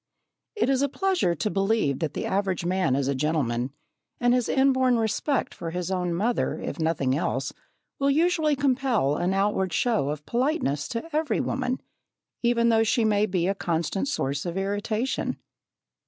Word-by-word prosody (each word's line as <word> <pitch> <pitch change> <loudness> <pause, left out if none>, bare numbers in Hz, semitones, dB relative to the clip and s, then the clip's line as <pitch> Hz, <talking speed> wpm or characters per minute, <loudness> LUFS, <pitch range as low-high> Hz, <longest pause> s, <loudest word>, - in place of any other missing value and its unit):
It 420 - +1
is 270 0 +2
a 280 - +2
pleasure 365 - +1
to 210 - -1
believe 195 -8 +1
that 160 - -2
the - - -2
average 190 -3 -1
man 180 -6 +1
is 135 -1 0
a 140 - +1
gentleman, 130 -4 0 0.5
and 245 0 +3
his 250 -2 +1
inborn 260 -2 +3
respect 225 +6 0
for 165 - -5
his 180 +2 -3
own 180 -2 -1
mother, 225 +7 0
if - - -5
nothing 150 -5 +1
else, 150 - -1 0.5
will 275 0 +2
usually 315 0 +2
compel 255 - +1
an 180 +4 0
outward 195 -2 +1
show 185 - +1
of 150 0 -5
politeness 235 - 0
to 230 +7 -4
every 310 0 +1
woman, 255 0 -1 0.6
even 235 -1 +3
though 225 -1 +4
she 225 +1 +2
may 210 0 +3
be 180 -2 0
a 195 - +2
constant 170 - -1
source 140 - -1
of 175 +1 -4
irritation. 205 +5 -1
205 Hz, 170 wpm, -26 LUFS, 170-255 Hz, 0.6 s, though